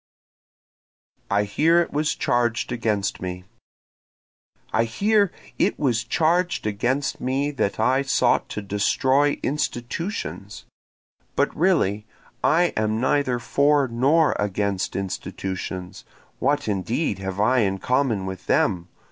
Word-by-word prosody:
I 100 +1 +2
Hear 160 +12 +3
It 170 - -1
Was 150 +1 0
Charged 120 -1 0
Against 110 -4 -1
Me 90 0 -5 1.3
I 115 +1 +3
hear 200 - +2 0.3
it - - +2
was 125 -5 +1
charged 170 +7 +1
against 120 +7 -1
me 135 +3 0
that 120 -8 -2
I 130 +5 +3
sought 135 - +1
to 105 - -5
destroy 130 +8 +2
institutions, 135 - -4 0.7
But - - +1
really 110 - +1 0.4
I 175 +2 +3
am 110 0 0
neither 130 -1 +1
for 140 +4 +2
nor 140 +7 +3
against 100 -1 -1
institutions, 95 -1 -5 0.4
(What 145 -1 +1
indeed 105 - -1
have 95 0 -5
I 125 +5 +3
in 95 -3 +1
common 120 -2 0
with 95 -1 -7
them? 85 -1 +1
120 Hz, 115 wpm, -23 LUFS, 100-145 Hz, 1.3 s, Hear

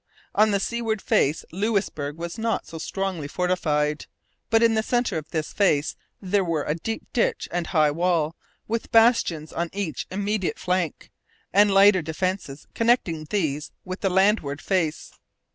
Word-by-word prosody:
On 215 +1 +4
the 200 -1 +1
seaward 225 +1 -1
face 150 -4 +1
Louisbourg 185 -7 -1
was 170 +6 -6
not 225 0 -1
so 165 - -8
strongly 190 -4 -3
fortified; 150 -3 0 0.4
but 225 +1 +4
in 230 -1 +5
the 220 - +2
centre 240 +2 0
of 155 -1 -4
this 155 -3 -3
face 155 -7 +2 0.2
there 195 0 +1
were 165 -4 -1
a 150 - -1
deep 220 +8 -4
ditch - - 0
and 175 -1 -2
high 155 -4 +3
wall, 165 -1 0 0.3
with 230 +1 -3
bastions 225 -9 +3
on 170 0 -2
each 190 -9 -3
immediate 200 0 -1
flank, 180 -3 -2 0.4
and 205 +1 +5
lighter 195 -1 +6
defences 160 -2 -3
connecting 225 -10 +1
these 150 -8 -1 0.2
with 185 +1 -5
the 195 - +2
landward 190 -6 +2
face. 170 -5 -1
185 Hz, 155 wpm, -24 LUFS, 155-210 Hz, 0.4 s, lighter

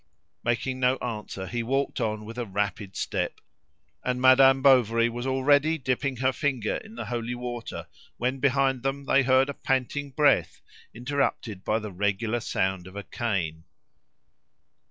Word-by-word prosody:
Making 130 +2 -1
no 125 0 +3
answer, 105 -5 -5
he 120 +4 -3
walked 135 +3 -1
on 110 -1 -2
with 115 +3 -7
a 120 - -2
rapid 100 0 -3
step; - - -2 0.6
and 125 0 -1
Madame 135 +1 +6
Bovary 120 -4 +5
was 120 +2 -4
already, 145 +4 +3
dipping 130 0 -1
her 130 +2 +1
finger 130 -8 -1
in 220 +1 -12
the - - -5
holy 120 0 -3
water 120 -1 -6 0.3
when 130 +2 -1
behind 135 -1 +2
them 135 +2 -2
they 140 - +4
heard 130 0 +4
a 140 - -3
panting 135 +2 -1
breath 145 +2 +2 0.3
interrupted 120 -6 -2
by 110 - +1
the 105 -2 -5
regular 105 +5 -1
sound 95 -4 -1
of 95 - -12
a 100 - -5
cane. 90 -10 -3
125 Hz, 155 wpm, -26 LUFS, 110-135 Hz, 0.6 s, Madame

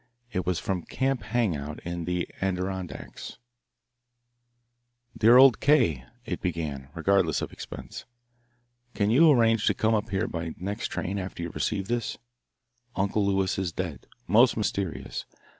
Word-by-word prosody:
It 90 -5 -2
was 90 -2 +1
from 95 0 -2
Camp 135 +6 -1
Hang 110 -3 0
out 75 +1 -6
in 85 0 -4
the 90 0 -1
Adirondacks. 95 -1 -4 1.8
"Dear 115 +3 +6
old 130 -3 +7
K.," 85 - +3 0.2
it - - -4
began, 75 -6 -3
regardless 85 -2 +2
of - - -6
expense, - - -8 0.9
"can 105 0 +1
you 160 +7 +6
arrange 115 -5 +4
to - - +3
come 110 +1 +2
up 110 +1 0
here 100 +2 0
by 85 -1 -4
next 100 +5 -3
train 100 +2 -3
after 90 -2 -5
you 85 - -4
receive 95 -1 -2
this? 120 -1 -2 0.8
Uncle 100 +2 +1
Lewis 95 -1 +1
is 95 -3 -1
dead. 85 -3 -5 0.2
Most 115 +6 +5
mysterious. 100 -5 -3
95 Hz, 140 wpm, -27 LUFS, 85-110 Hz, 1.8 s, old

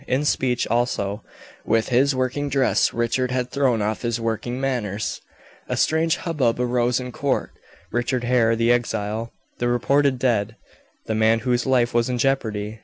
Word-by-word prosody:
In 135 +3 0
speech 125 -4 +1
also 110 -3 -1 0.4
with 115 0 +1
his 135 +3 +3
working 130 +3 -1
dress 135 -1 +2
Richard 120 +2 0
had 125 0 -2
thrown 130 -6 +1
off 110 +1 -2
his 120 -1 -1
working 115 +2 -3
manners. 115 -6 -2 0.5
A - - -1
strange 160 +1 +2
hubbub 135 -9 0
arose 125 0 +1
in 125 0 -6
court. 140 +1 -1 0.4
Richard 120 +1 -1
Hare, 120 -2 +3
the 115 +1 +2
exile 115 -1 -1 0.3
the 120 - 0
reported 135 +3 +2
dead 115 -4 0 0.5
the 110 - -2
man 110 +1 +3
whose 120 +1 0
life 125 -2 +2
was 120 +1 +1
in 125 - -1
jeopardy! 110 -5 -1
120 Hz, 160 wpm, -23 LUFS, 115-130 Hz, 0.5 s, his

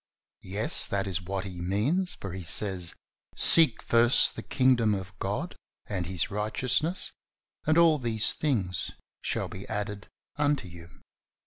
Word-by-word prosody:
Yes, 105 +4 +2
that 100 0 -2
is 95 -2 -3
what 95 +1 -4
He 90 -3 -7
means, 125 - -1
for 95 -3 -8
He 95 - -6
says, 90 0 +3 0.4
"Seek 160 -9 +6
first 120 +2 +3
the - - -6
Kingdom 125 -5 +2
of 95 0 -8
God - - -3 0.3
and 90 -4 -4
His 90 -3 -2
righteousness 130 - 0 0.6
and 155 +1 +3
all 165 -3 +5
these 115 -3 0
things 100 - -2 0.3
shall - - -2
FINANCE. 95 - -9
101 105 -1 -2
be 105 - -6
added - - -18 0.3
unto 145 -7 0
you." 85 0 -14
105 Hz, 150 wpm, -27 LUFS, 95-130 Hz, 0.6 s, Seek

